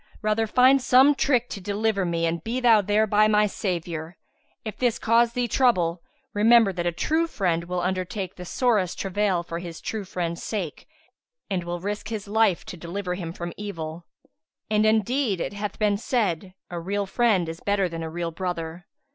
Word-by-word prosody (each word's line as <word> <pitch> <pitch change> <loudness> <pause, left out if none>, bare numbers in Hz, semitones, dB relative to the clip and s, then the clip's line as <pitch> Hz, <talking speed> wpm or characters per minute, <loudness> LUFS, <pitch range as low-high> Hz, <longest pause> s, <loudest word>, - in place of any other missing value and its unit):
Rather 215 +1 +1
find 255 +4 +5
some 260 +3 +6
trick 255 -4 +1
to 200 - -7
deliver 205 0 0
me 170 -1 0
and 165 0 -2
be 235 +3 -2
thou 230 -4 +5
thereby 210 +1 +3
my 210 0 +4
saviour. 170 -5 -4 0.5
If 215 - -5
this 245 -3 +1
cause 230 +1 +3
thee 245 0 0
trouble, 180 -9 +2 0.3
remember 220 -1 +5
that 175 -1 -2
a - - +2
true 320 - 0
friend 170 - -1
will 180 0 -2
undertake 185 +1 -2
the 180 - -8
sorest 205 -2 +1
travail 195 -2 0
for 170 0 -5
his 170 -2 -8
true 220 -2 -4
friend's 175 -3 -4
sake 190 -8 -4 0.6
and 180 -2 0
will 175 0 -4
risk 205 +3 -4
his 215 -3 -5
life 210 -3 +2
to 180 - -8
deliver 180 +3 -4
him 175 -3 -5
from 170 0 -6
evil; 170 -5 -6 0.6
and 215 0 +3
indeed 220 -1 +1
it 180 - -3
hath 205 0 -4
been 210 -2 +2
said, 195 -6 -1 0.2
'A 175 - -3
leal 200 +4 -2
friend 195 -4 +2
is 165 +1 -6
better 200 -2 +1
than 165 -1 -6
a 160 - -4
real 170 +1 -3
brother.' 175 0 -5
195 Hz, 180 wpm, -25 LUFS, 175-220 Hz, 0.6 s, some